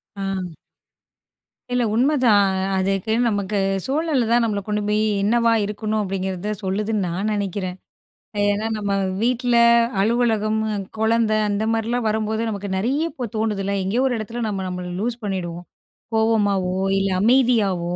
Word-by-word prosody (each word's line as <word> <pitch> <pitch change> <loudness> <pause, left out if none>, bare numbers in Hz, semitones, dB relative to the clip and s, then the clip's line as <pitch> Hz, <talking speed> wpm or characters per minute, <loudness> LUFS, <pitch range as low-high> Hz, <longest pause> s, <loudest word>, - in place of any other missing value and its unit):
ஆ. 200 - -7 1.5
இல்ல 245 0 +2
உண்மதான் 235 -7 +3 0.2
அதுக்கு 195 +3 0 0.2
நமக்கு 205 -1 -1 0.3
சூழல் 295 0 0
தான் 240 +1 +4
நம்மள 210 -3 -1
கொண்டு 210 0 -1
போய் 210 +1 +1 0.2
என்னவா 230 +2 +3
இருக்கணும்? 215 +1 -2
அப்டிங்கிறத 190 +1 -3
சொல்லுதுன்னு 205 +3 -1
நான் 185 +5 -2
நெனைக்கிறேன். 195 -3 -2 0.7
ஏனா 205 +1 +1
நம்ம 200 -1 -2 0.3
வீட்ல, 245 +1 +1 0.5
அலுவலகம், 220 -1 +1 0.4
கொழந்த 220 0 +2 0.2
அந்த 205 +1 -1
மாரிலாம் 230 +2 -1
வரும்போது 220 0 -1
நமக்கு 200 -1 -4
நெறைய 270 +11 0
இப்ப 245 -3 -5
தோணுதுல. 210 -3 -1
எங்கேயோ 220 +7 0
ஒரு 250 - 0
எடத்ல 230 +2 -4
நம்ம 195 -3 -3
நம்மள 180 0 -5
லூஸ் 175 - -5
லூஸ் 235 +2 -2
பண்ணிடுவோம். 175 -3 -4 0.5
கோவமாவோ 205 -5 +2 0.2
இல்ல 195 0 0
அமைதியாவோ 210 -7 +2
215 Hz, 130 wpm, -22 LUFS, 195-230 Hz, 1.5 s, தான்